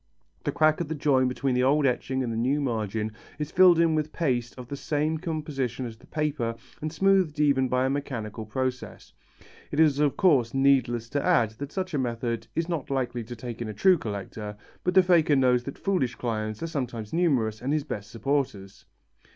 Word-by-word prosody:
The - - +1
crack 155 +1 +3
of 170 - -2
the 160 - -3
join 135 -3 +2
between 130 +1 -1
the 125 - +2
old 140 +3 +3
etching 130 +1 0
and 115 -2 -2
the - - -3
new 130 +6 +1
margin 110 -5 -2 0.3
is 150 0 -4
filled 185 -2 +6
in 165 -1 +4
with 155 0 -1
paste 125 -7 -1
of 125 -1 -8
the 140 - -5
same 150 +2 -1
composition 150 -7 -3
as 115 -2 -7
the - - -20
paper 145 -7 -1 0.3
and 155 0 -3
smoothed 185 -2 +2
even 140 -3 +3
by 125 +1 +2
a - - +1
mechanical 120 -7 -4
process. 130 +2 -4 0.6
It 145 - -3
is 150 -3 +4
of 150 -2 +2
course 135 -10 +3
needless 130 -4 +2
to 145 +2 -1
add 115 -2 +3
that 140 +1 -5
such 185 0 -3
a 145 - +1
method 115 -2 -2
is 165 0 0
not 165 -6 -3
likely 125 -3 -1
to 120 +2 -8
take 120 0 -7
in 115 - -3
a 105 - -6
true 185 - +4
collector, 105 -1 -6 0.3
but 180 0 0
the 190 - +8
faker 170 -5 +4
knows 125 -2 +3
that 140 - -6
foolish 180 -11 0
clients 110 -1 -3
are - - -1
sometimes 120 -8 -4
numerous 130 -11 +1
and 130 +3 -2
his 150 -1 +1
best 105 -8 -6
supporters. 115 -6 -2
135 Hz, 205 wpm, -27 LUFS, 115-150 Hz, 0.6 s, the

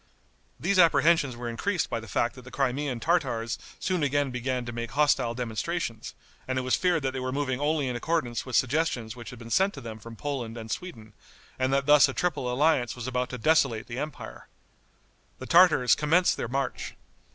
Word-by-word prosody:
These 185 +3 +1
apprehensions 160 -5 +4
were 120 0 -5
increased 170 - -1
by - - -3
the 110 - -10
fact 120 +4 0
that 130 - -12
the 125 - -12
Crimean 135 -1 -1
Tartars 120 -7 0 0.2
soon 185 -3 -1
again 145 -1 +1
began 125 0 -2
to 120 - -5
make 120 0 -5
hostile 145 -5 +2
demonstrations, 115 +1 -4 0.3
and 130 0 -1
it 130 - 0
was 130 - -1
feared 175 -5 +1
that 135 - 0
they 130 - -4
were 130 0 -3
moving 135 -2 -1
only 145 -1 0
in 125 - -2
accordance 125 -3 -1
with 130 -3 -5
suggestions 125 -3 0
which 120 -3 -9
had 125 - -10
been 115 0 -10
sent 195 - +2
to - - -8
them 110 -2 -8
from 115 +2 -10
Poland 120 -3 -4
and 110 -1 -7
Sweden, 115 - -6 0.5
and 130 0 +1
that 135 0 +1
thus 150 -1 +6
a 135 - -5
triple 135 -8 -1
alliance 130 -2 +2
was 120 -2 -7
about 125 -1 -2
to 125 - -5
desolate 135 -4 +2
the 120 +1 -6
empire. 150 -1 -7 0.9
The - - -8
Tartars 170 -9 +5
commenced 165 +4 +3
their - - -4
march. 135 +2 -3
130 Hz, 200 wpm, -27 LUFS, 120-150 Hz, 0.9 s, thus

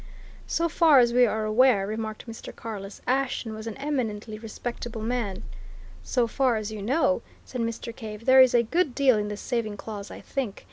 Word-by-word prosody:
"So 335 - +1
far 325 -3 +5
as 240 -2 +5
we 245 0 +6
are 220 0 -1
aware," 215 -2 +4
remarked 215 +1 -4
Mr. 230 -2 -9
Carless, 205 -3 -7
"Ashton 255 -3 0
was 220 +1 -7
an 225 - -5
eminently 225 -7 -3
respectable 225 0 -6
man!" 225 -5 -2 0.6
"So 245 -3 +1
far 250 +1 +1
as 215 0 -3
you 215 -2 -6
know!" 275 +6 +2 0.2
said 250 - -4
Mr. 230 0 -4
Cave. 215 0 -8
"There 260 0 +8
is 255 -1 +5
a 235 - +5
good 305 +2 0
deal 260 -6 +4
in 210 - -2
the 210 0 -4
saving 220 -3 -2
clause, 205 -1 -7
I - - -9
think. 255 -8 -4
230 Hz, 190 wpm, -26 LUFS, 215-255 Hz, 0.6 s, There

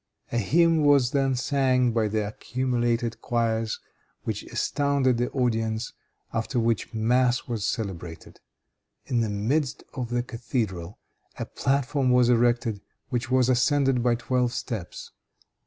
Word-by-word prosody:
A 120 - +1
hymn 165 - +3
was 140 -4 +4
then 135 -2 +1
sang 130 -1 +2
by 110 -1 +1
the 105 0 -1
accumulated 120 0 -1
choirs, 115 -2 0 0.4
which - - -3
astounded 140 -4 +1
the 120 - 0
audience; 115 -3 -1 0.4
after 115 +2 -1
which 115 -2 0
mass 120 +2 +1
was 115 -5 -2
celebrated. 90 -7 -5 0.7
In 120 - 0
the 110 - 0
midst 125 +8 -1
of 125 -4 -4
the 120 0 0
cathedral, 110 -7 -3 0.4
a - - -3
platform 135 0 0
was 125 -1 +4
erected, 120 -3 +2 0.3
which 120 -2 -2
was 130 -1 +3
ascended 130 0 +3
by 120 0 +3
twelve 125 0 0
steps. 110 -8 -5
120 Hz, 130 wpm, -26 LUFS, 115-130 Hz, 0.7 s, was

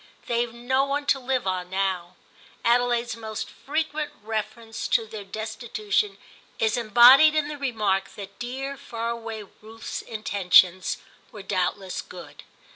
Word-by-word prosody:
They've 240 -2 0
no 245 +3 0
one 285 +1 -1
to 275 - +3
live 260 -2 -1
on 185 -1 -2
now. 185 -2 -2 0.5
Adelaide's 240 0 +2
most 220 -2 -5
frequent 305 +1 -3
reference 220 +1 -4
to 225 - +2
their 215 -1 -8
destitution 215 -1 -2 0.4
is 220 -1 +1
embodied 245 +7 +7
in 300 -1 +1
the 300 - -5
remark 210 -8 -1
that 200 0 -10
dear 265 +3 -4
far 230 -2 -4
away 225 -2 -6 0.2
Ruth's 225 +1 -7
intentions 185 -4 +3 0.3
were 210 -3 -9
doubtless 185 0 -2
good. - - -11
225 Hz, 130 wpm, -25 LUFS, 200-245 Hz, 0.5 s, embodied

